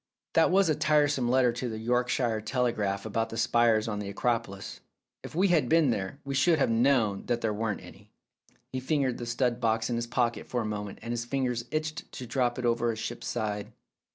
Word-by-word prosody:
That 165 Hz, -, +5 dB
was 190 Hz, +1 st, +4 dB
a 155 Hz, -, +3 dB
tiresome 150 Hz, -4 st, +2 dB
letter 125 Hz, -1 st, +4 dB
to 120 Hz, +1 st, -4 dB
the 110 Hz, -, -5 dB
Yorkshire 120 Hz, -1 st, 0 dB
Telegraph 110 Hz, -4 st, -1 dB
about 115 Hz, +1 st, -1 dB
the 115 Hz, -, -6 dB
spires 115 Hz, -1 st, +3 dB
on 105 Hz, -2 st, -2 dB
the 100 Hz, -1 st, -4 dB
Acropolis. 100 Hz, -2 st, -2 dB, 0.4 s
If -, -, -9 dB
we 190 Hz, +3 st, +3 dB
had 170 Hz, -4 st, +3 dB
been 160 Hz, -5 st, +4 dB
there, 100 Hz, +5 st, -3 dB
we 140 Hz, -, -3 dB
should 160 Hz, +5 st, +4 dB
have 135 Hz, -5 st, +2 dB
known 115 Hz, -4 st, +2 dB
that 120 Hz, -1 st, 0 dB
there 110 Hz, -1 st, 0 dB
weren't 105 Hz, 0 st, -2 dB
any." -, -, -14 dB, 0.6 s
He 130 Hz, -, -1 dB
fingered 130 Hz, -2 st, 0 dB
the 120 Hz, -, -5 dB
stud 120 Hz, 0 st, 0 dB
box 115 Hz, 0 st, +1 dB
in 120 Hz, -, 0 dB
his 120 Hz, 0 st, -2 dB
pocket 120 Hz, 0 st, -1 dB
for 125 Hz, -, -2 dB
a -, -, -3 dB
moment, 105 Hz, -2 st, -4 dB
and 115 Hz, -, -3 dB
his 120 Hz, 0 st, -3 dB
fingers 125 Hz, -2 st, -1 dB
itched 155 Hz, 0 st, -3 dB
to 130 Hz, -, -6 dB
drop 120 Hz, 0 st, 0 dB
it 125 Hz, -, -3 dB
over 120 Hz, 0 st, +2 dB
a -, -, -4 dB
ship's -, -, -5 dB
side. 105 Hz, -3 st, -3 dB
120 Hz, 210 wpm, -28 LUFS, 110-130 Hz, 0.6 s, That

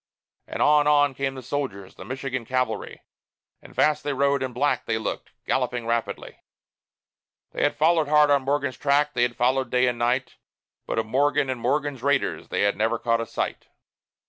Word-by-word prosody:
And -, -, -1 dB
on, 150 Hz, 0 st, +4 dB
on, 145 Hz, -2 st, +4 dB
came 135 Hz, 0 st, -3 dB
the 130 Hz, -, -8 dB
soldiers 120 Hz, -8 st, -4 dB
the -, -, -11 dB
Michigan 130 Hz, -1 st, -4 dB
cavalry 125 Hz, -1 st, -3 dB, 0.6 s
And -, -, -16 dB
fast 150 Hz, 0 st, +2 dB
they 145 Hz, -, -1 dB
rode, 140 Hz, 0 st, +1 dB
and 130 Hz, -1 st, -2 dB
black 135 Hz, +4 st, 0 dB
they 110 Hz, -, 0 dB
looked, 110 Hz, -, -4 dB, 0.2 s
galloping 125 Hz, -2 st, -1 dB
rapidly, 115 Hz, 0 st, -3 dB, 1.1 s
They -, -, -4 dB
had 145 Hz, -, +2 dB
followed 160 Hz, 0 st, +3 dB
hard 150 Hz, 0 st, +4 dB
on 140 Hz, -1 st, +4 dB
Morgan's 135 Hz, -1 st, -1 dB
track; 145 Hz, +1 st, +2 dB
they 120 Hz, -, -1 dB
had 120 Hz, 0 st, +1 dB
followed 130 Hz, +1 st, +1 dB
day 125 Hz, +1 st, +3 dB
and 120 Hz, -1 st, -1 dB
night; 125 Hz, +2 st, 0 dB, 0.5 s
But -, -, -3 dB
of 115 Hz, -, +1 dB
Morgan 140 Hz, +3 st, +1 dB
and 125 Hz, -2 st, -5 dB
Morgan's 140 Hz, +1 st, -1 dB
raiders 140 Hz, +1 st, 0 dB
they -, -, -2 dB
had 100 Hz, 0 st, +2 dB
never 115 Hz, +2 st, 0 dB
caught 115 Hz, 0 st, 0 dB
a 115 Hz, -, -5 dB
sight. -, -, -4 dB
130 Hz, 185 wpm, -24 LUFS, 120-145 Hz, 1.1 s, on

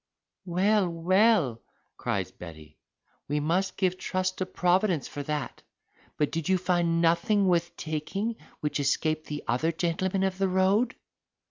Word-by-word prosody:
"Well, 190 Hz, +2 st, +2 dB
well," 175 Hz, -, +3 dB, 0.3 s
cries -, -, -2 dB
Betty, 80 Hz, -3 st, -12 dB, 0.5 s
"we 150 Hz, +1 st, 0 dB
must 180 Hz, +6 st, 0 dB
trust 185 Hz, 0 st, -1 dB
to 185 Hz, -, -1 dB
Providence 180 Hz, -3 st, +1 dB
for 145 Hz, -, -6 dB
that. 150 Hz, -1 st, -4 dB, 0.6 s
But 150 Hz, -, +1 dB
did 165 Hz, +1 st, -3 dB
you 190 Hz, -, +4 dB
find 175 Hz, -2 st, +1 dB
nothing 170 Hz, +5 st, +3 dB
worth 170 Hz, -1 st, +1 dB
taking 170 Hz, +9 st, -3 dB, 0.2 s
which 150 Hz, 0 st, -1 dB
escaped 155 Hz, +3 st, 0 dB
the 150 Hz, 0 st, -5 dB
other 130 Hz, +8 st, +1 dB
gentlemen 180 Hz, +3 st, -1 dB
of 190 Hz, 0 st, -1 dB
the 195 Hz, -1 st, +2 dB
road?" 195 Hz, +6 st, +2 dB
175 Hz, 135 wpm, -28 LUFS, 155-190 Hz, 0.6 s, you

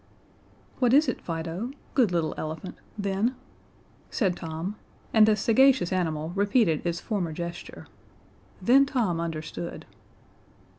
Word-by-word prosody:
"What 250 Hz, 0 st, +4 dB
is 300 Hz, +2 st, +5 dB
it, -, -, -2 dB
Fido 165 Hz, +6 st, -4 dB, 0.2 s
good 245 Hz, -8 st, +3 dB
little 165 Hz, -3 st, 0 dB
elephant 160 Hz, +4 st, -5 dB, 0.2 s
then?" 200 Hz, +5 st, 0 dB, 0.7 s
said 190 Hz, -7 st, 0 dB
Tom, 165 Hz, +5 st, -5 dB, 0.4 s
and 220 Hz, -1 st, +7 dB
the 215 Hz, -, +5 dB
sagacious 230 Hz, -2 st, +4 dB
animal 160 Hz, -4 st, -1 dB
repeated 200 Hz, -, +2 dB
its 170 Hz, 0 st, -1 dB
former 195 Hz, -7 st, -2 dB
gesture. 170 Hz, +1 st, -7 dB, 0.7 s
Then 260 Hz, +8 st, +5 dB
Tom 220 Hz, -, 0 dB
understood. 155 Hz, -, -5 dB
185 Hz, 115 wpm, -27 LUFS, 165-225 Hz, 0.7 s, and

